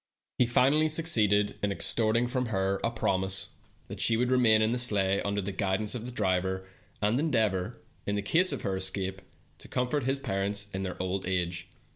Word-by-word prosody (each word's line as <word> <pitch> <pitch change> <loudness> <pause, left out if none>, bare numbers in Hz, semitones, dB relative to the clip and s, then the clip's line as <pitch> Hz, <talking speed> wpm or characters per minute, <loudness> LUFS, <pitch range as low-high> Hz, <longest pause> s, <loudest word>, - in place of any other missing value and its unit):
157 150 +6 +3
ceeded 105 -8 +3
in 100 - 0
extorting 115 +3 +1
from 125 0 -2
her 95 -2 -1
a 115 - +2
promise 95 -4 -1 0.4
that - - -8
she 115 - +2
would 125 +2 0
remain 120 -4 +5
in 110 +1 +2
the 125 - 0
sleigh 100 -5 +3
under 100 0 -2
the 100 - -3
guidance 100 +2 -1
of 120 -1 -5
the - - -6
driver, 95 -3 -1 0.4
and 110 +5 +2
endeavor, 110 - 0 0.3
in 100 0 0
case 175 - +3
of - - -4
her 95 - -1
escape, 95 0 -3 0.4
to - - -13
comfort 125 +2 -1
his 135 +1 +1
parents 100 -3 -2
in 95 - -3
their 95 -1 -5
old 95 0 -2
age. 90 -1 -2
105 Hz, 180 wpm, -29 LUFS, 95-120 Hz, 0.4 s, remain